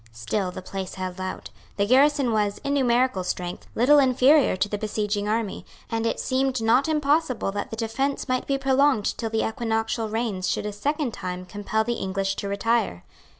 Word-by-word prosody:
Still 180 - -2
the 180 - -8
place 190 0 -5
held 185 0 -5
out; 185 0 -5 0.3
the 200 - +2
garrison 275 +2 +4
was, 205 -1 +1
in 280 0 -1
numerical 250 -6 +2
strength, 180 0 -4
little 280 +6 +5
inferior 265 -1 +4
to 190 +2 +1
the 205 0 -4
besieging 210 -1 -2
army; 220 -2 -2 0.3
and 225 0 0
it - - -1
seemed 260 -1 0
not 230 +6 +3
impossible 295 -7 +1
that 205 0 -4
the - - -5
defence 235 +6 -2
might 255 -1 -1
be 275 - +1
prolonged 270 -4 +2
till 225 - -2
the 220 0 0
equinoctial 225 0 -1
rains 210 -5 -2
should - - -1
a 210 - -3
second 285 +4 -1
time 180 0 -5
compel 205 +3 -1
the 240 +2 -1
English 195 0 -1
to 200 - -3
retire. 200 - 0
225 Hz, 185 wpm, -25 LUFS, 200-260 Hz, 0.3 s, little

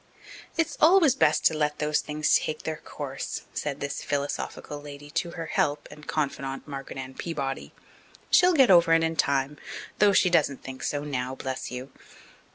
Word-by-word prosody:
"It's 330 -2 0
always 325 -3 +6
best 155 - +2
to - - +6
let 150 -1 0
those 150 0 +1
things 150 0 +2
take 155 0 -4
their 160 -1 -3
course," 135 -2 -6
said 145 -1 -3
this 140 0 -3
philosophical 145 +1 -3
lady 145 0 -10
to 170 +1 -1
her 165 - -3
"help" 145 -2 0
and 150 0 -13
confidant, 135 -3 -3
Margaret 135 -2 -7
Ann 130 0 -6
Peabody. 140 -4 -4 0.6
"She'll 360 0 +6
get 265 - +6
over 170 -2 +6
it 165 0 +4
in 165 0 0
time 140 -1 0 0.4
though 205 0 +6
she 185 -2 +4
doesn't 145 -5 +2
think 130 0 -8
so 145 0 -2
now, 130 -3 -3
bless 130 0 -4
you." 125 +2 -7
150 Hz, 170 wpm, -27 LUFS, 140-165 Hz, 0.6 s, always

